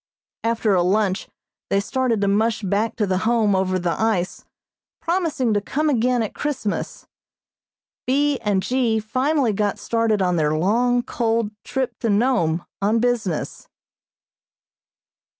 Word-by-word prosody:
After 225 Hz, -2 st, +1 dB
a 180 Hz, -, +3 dB
lunch 190 Hz, +1 st, 0 dB, 0.4 s
they 195 Hz, -, +2 dB
started 240 Hz, 0 st, 0 dB
to 200 Hz, -, +2 dB
mush 220 Hz, +2 st, +1 dB
back 205 Hz, +4 st, 0 dB
to 210 Hz, -, 0 dB
the 185 Hz, -1 st, 0 dB
Home 220 Hz, -1 st, +2 dB
over 190 Hz, 0 st, +1 dB
the 175 Hz, -1 st, -1 dB
ice, 200 Hz, -5 st, 0 dB, 0.6 s
promising 330 Hz, -, 0 dB
to 205 Hz, -, +1 dB
come 300 Hz, +8 st, 0 dB
again 245 Hz, -1 st, +2 dB
at 215 Hz, -, -5 dB
Christmas. 270 Hz, -8 st, -3 dB, 1.0 s
B. 280 Hz, +1 st, +2 dB
and 205 Hz, -4 st, 0 dB
G. 245 Hz, -3 st, +1 dB
finally 255 Hz, +2 st, 0 dB
got 205 Hz, 0 st, 0 dB
started 230 Hz, -2 st, 0 dB
on 180 Hz, -2 st, +1 dB
their 155 Hz, -1 st, +1 dB
long, 240 Hz, +8 st, +2 dB
cold 225 Hz, -3 st, -1 dB
trip 265 Hz, 0 st, -2 dB
to 230 Hz, -, -1 dB
Nome 200 Hz, -7 st, +1 dB, 0.2 s
on 210 Hz, +3 st, +2 dB
business. 230 Hz, -8 st, -1 dB
220 Hz, 135 wpm, -22 LUFS, 200-245 Hz, 1.0 s, a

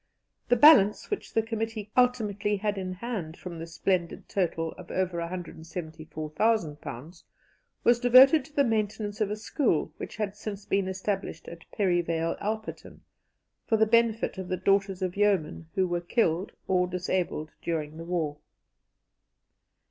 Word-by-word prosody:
The 245 Hz, -, +5 dB
balance 240 Hz, -, +6 dB
which 415 Hz, -, -3 dB
the 225 Hz, -, +3 dB
committee 225 Hz, -2 st, -4 dB
ultimately 210 Hz, -5 st, +2 dB
had 210 Hz, +1 st, -1 dB
in 185 Hz, -1 st, -4 dB
hand 185 Hz, -5 st, -5 dB
from 170 Hz, -2 st, -8 dB
this 165 Hz, 0 st, -8 dB
splendid 180 Hz, -3 st, -1 dB
total 165 Hz, -4 st, -1 dB
of 180 Hz, -, -12 dB
over 185 Hz, -2 st, -1 dB
£174,000 160 Hz, -, -3 dB, 0.6 s
was 240 Hz, 0 st, +4 dB
devoted 260 Hz, +4 st, +7 dB
to 295 Hz, -, -17 dB
the 280 Hz, -, +4 dB
maintenance 215 Hz, -2 st, -1 dB
of 210 Hz, -, +2 dB
a 210 Hz, -, -2 dB
school 215 Hz, -, 0 dB
which -, -, -7 dB
had 210 Hz, -2 st, -3 dB
since 205 Hz, -1 st, -7 dB
been 195 Hz, -1 st, 0 dB
established 190 Hz, -2 st, -3 dB
at 170 Hz, -1 st, -11 dB
Perivale 170 Hz, -4 st, 0 dB
Alperton, 215 Hz, +1 st, -5 dB, 0.7 s
for 220 Hz, -, +3 dB
the 220 Hz, -, +5 dB
benefit 230 Hz, -2 st, +2 dB
of 190 Hz, -, -5 dB
the 185 Hz, -, -1 dB
daughters 195 Hz, 0 st, +1 dB
of 180 Hz, -1 st, -2 dB
yeomen 180 Hz, -6 st, +1 dB
who 190 Hz, -1 st, +2 dB
were 175 Hz, -1 st, -1 dB
killed 175 Hz, -1 st, 0 dB, 0.2 s
or 180 Hz, -1 st, +2 dB
disabled 180 Hz, -3 st, -2 dB
during 155 Hz, -2 st, -3 dB
the 165 Hz, -, -6 dB
war. 165 Hz, -4 st, -2 dB
190 Hz, 145 wpm, -28 LUFS, 170-215 Hz, 0.7 s, devoted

